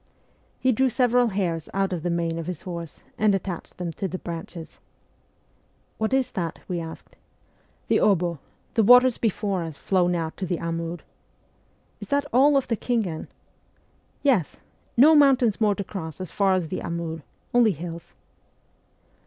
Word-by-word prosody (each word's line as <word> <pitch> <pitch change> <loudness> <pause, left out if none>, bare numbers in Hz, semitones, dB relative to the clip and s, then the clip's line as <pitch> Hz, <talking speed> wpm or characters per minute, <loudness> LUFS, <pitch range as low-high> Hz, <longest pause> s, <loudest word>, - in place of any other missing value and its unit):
He 260 - +3
drew 260 +3 +2
several 245 0 +3
hairs 180 -6 -2
out 195 -1 +1
of 170 - -3
the 175 - -2
mane 170 -1 -1
of 165 - -6
his 180 -4 -5
horse, 170 -3 -7 0.2
and 210 -2 +4
attached 185 -2 -5
them 175 -2 -4
to 195 - -3
the 185 +1 -4
branches. 170 -1 -8 0.6
' - - -40
What 220 +2 0
is 265 -1 +1
that? 170 -4 -3
' - - -33
we 180 -2 -2
asked. 165 -1 -9 0.4
' - - -38
The - - +3
obo 175 -5 +2 0.3
the 225 - +3
waters 245 +2 +6
before 205 -4 0
us 160 -4 -6
flow 185 -2 +1
now 170 -2 -1
to 190 - -3
the 175 - -1
Amur.' 165 0 -4 0.5
' - - -39
Is - - -7
that 285 0 +1
all 275 +4 +6
pf 275 -2 +2
the 230 - -1
Khingan? 210 -11 -2 0.3
' - - -39
' - - -39
Yes! 245 - +2 0.4
No 295 +6 +8
mountains 260 -7 +4
more 210 -2 +3
to 200 - -3
cross 170 -5 -7
as 185 -3 -6
far 195 -2 +2
as 180 -4 -1
the 185 - -3
Amur: 165 -1 -4 0.3
only 240 -3 +5
hills 170 +1 -8
185 Hz, 180 wpm, -25 LUFS, 170-230 Hz, 0.6 s, No